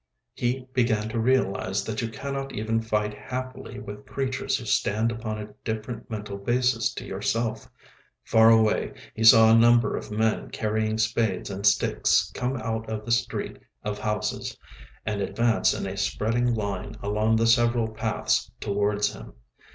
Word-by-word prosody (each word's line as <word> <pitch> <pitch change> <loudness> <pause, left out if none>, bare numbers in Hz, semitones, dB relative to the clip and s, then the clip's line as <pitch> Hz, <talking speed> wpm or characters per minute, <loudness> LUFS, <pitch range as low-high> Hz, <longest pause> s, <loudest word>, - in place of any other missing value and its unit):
He 125 +1 -2
began 110 -4 +1
to 115 - -2
realise 110 -6 +1
that 110 -1 -3
you 115 - -2
cannot 135 +3 -5
even 110 +1 -1
fight 105 -1 -1
happily 130 +4 -6
with 105 0 -9
creatures 135 -2 -1
who - - -8
stand 110 +3 +1
upon 110 -2 -4
a 105 0 -8
different 110 +3 -5
mental 105 -2 -5
basis 120 +1 +1
to - - -6
yourself. 110 +3 -2 0.5
Far 110 0 +5
away 110 -1 +3 0.2
he 110 - -3
saw 110 0 +8
a - - +7
number 120 +1 +5
of - - -6
men 110 +1 0
carrying 110 0 -1
spades 110 -4 0
and 100 +1 0
sticks 100 0 +2
come 130 +1 -2
out 110 -1 -3
of 110 -1 -4
the 120 - -3
street 115 - -1 0.2
of 105 0 -3
houses 105 -1 -2 0.5
and 105 -2 -2
advance 115 +3 +2
in - - -3
a 95 0 -4
spreading 115 +4 0
line 105 0 -4
along 105 +2 +1
the 115 +1 +2
several 120 0 +3
paths 110 - -1
towards 105 +1 0
him. - - -11
110 Hz, 160 wpm, -26 LUFS, 105-120 Hz, 0.5 s, saw